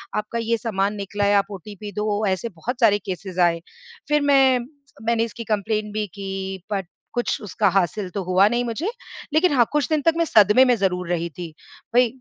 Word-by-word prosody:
आपका 215 +2 -2
ये 230 0 0
सामान 205 -2 -1
निकला 205 0 -3
है, 205 0 +3
आप 200 +1 +1
ओटीपी 205 +2 -8
दो। 210 0 -1
ऐसे 190 +5 -1
बहुत 220 +9 -5
सारे 205 -2 +5
केसेस 185 0 -6
आए। 165 0 -4 0.5
फिर 295 0 +3
मैं 270 -3 +4 0.4
मैंने 230 0 +1
इसकी 230 +1 -8
कम्प्लेंट 210 0 -2
भी 215 -1 -2
की, 195 -1 -5 0.2
बट 190 -4 -2 0.3
कुछ 240 -1 -1
उसका 205 - 0
हासिल 195 +1 0
तो 200 - -3
हुआ 185 +2 +4
नहीं 240 +1 0
मुझे। 270 - -2 0.4
लेकिन 320 +1 +4
हाँ, 240 -3 +5
कुछ 295 -1 +1
दिन 310 -2 +1
तक 330 - +6
मैं 335 - +2
सदमे 215 - +6
में 250 - +4
ज़रूर 180 -3 -1
रही 170 -1 -1
थी। 170 -1 -8 0.4
भई, 250 0 +6
210 Hz, 195 wpm, -22 LUFS, 195-235 Hz, 0.5 s, तक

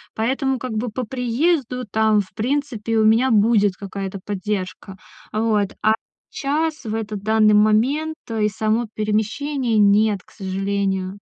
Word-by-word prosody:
поэтому 265 +3 0
как 255 0 -5
бы 230 +3 -2
по 235 +3 -4
приезду 250 +2 0
там, 220 0 +3
в 185 - -12
принципе, 230 -1 -1
у 215 - +4
меня 230 +4 +4
будет 210 -2 +3
какая-то 195 0 -6
поддержка. 195 -1 -4 0.3
Вот. 215 -2 +1
А 215 +1 +4 0.4
щас, 310 +2 -1
в 215 - -3
этот 215 -2 -4
данный 215 -1 +4
момент, 245 +10 +3
э, 220 -2 -1
и 210 - +2
само 220 +2 0
перемещение- 220 +4 -1
нет, 205 0 +4
к - - -24
сожалению. 195 -1 -2
220 Hz, 145 wpm, -21 LUFS, 205-250 Hz, 0.4 s, у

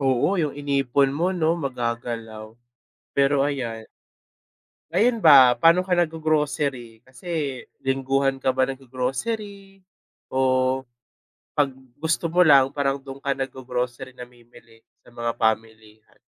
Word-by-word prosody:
Oo 135 +8 +1
yung 155 -5 0
inipon 140 -1 +1
mo 170 +7 -1
'no, 165 -1 +1
magagalaw. 115 -5 -5 0.6
Pero 140 0 +3
ayan. 115 -6 -5 1.1
Ngayon 230 +6 +3
ba, 130 -5 +8
pa'no 165 +8 +5
ka 185 -1 -1
naggo-grocery? 150 -8 -1
Kasi 130 +2 -19 0.6
lingguhan 135 0 0
ka 130 -1 0
ba 130 0 +1
naggo-grocery 195 - -5 0.5
o 130 0 +1 0.7
'pag 145 -2 +2 0.2
gusto 160 +2 -1
mo 180 +2 +4
lang, 140 -4 +6
parang 140 -1 0
do'n 135 0 -11
ka 140 - +1
naggo-grocery, 130 -1 -4
namimili 120 -2 -16 0.2
sa - - -23
mga 120 -1 -3
pamilihan? 110 -1 -3
135 Hz, 115 wpm, -23 LUFS, 125-150 Hz, 1.1 s, ba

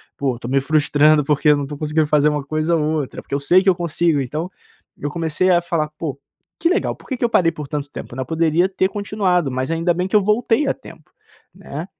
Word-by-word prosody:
po 135 -3 -1
estou 120 +1 -7
me 135 0 +2
frustrando 150 0 +3
porque 150 +1 +2
eu 145 - +5
não 145 - -2
estou 145 +1 -6
conseguindo 155 +1 0
fazer 150 0 +3
uma 150 -2 -2
coisa 155 +3 0
ou 155 - 0 0.2
outra, 135 - -7
porque - - -10
eu 140 - +1
sei 180 +7 +4
que 195 - -6
eu 185 - +3
consigo." 170 -3 0
Então 155 +8 -4 0.5
eu 145 - -4
comecei 165 +3 0
a 175 -1 +4
falar: 165 -3 -1
"Pô 145 -5 -4 0.4
que 335 - +2
legal 390 - 0
,por - - -20
que 260 - -2
que 240 - 0
eu 235 - +1
parei 170 -6 +3
por 150 -3 -8
tanto 145 -1 -4
tempo - - -8
né 130 - -3
Eu - - -3
poderia 165 +3 +1
ter 190 0 +1
continuado, 195 -7 0
mas 130 +4 -2
ainda 165 +1 +1
bem 180 +2 -2
que 190 - -2
eu 210 - +6
voltei 225 +6 +1
a - - +2
tempo - - -15 0.4
né? - - -7
155 Hz, 250 wpm, -20 LUFS, 145-180 Hz, 0.5 s, eu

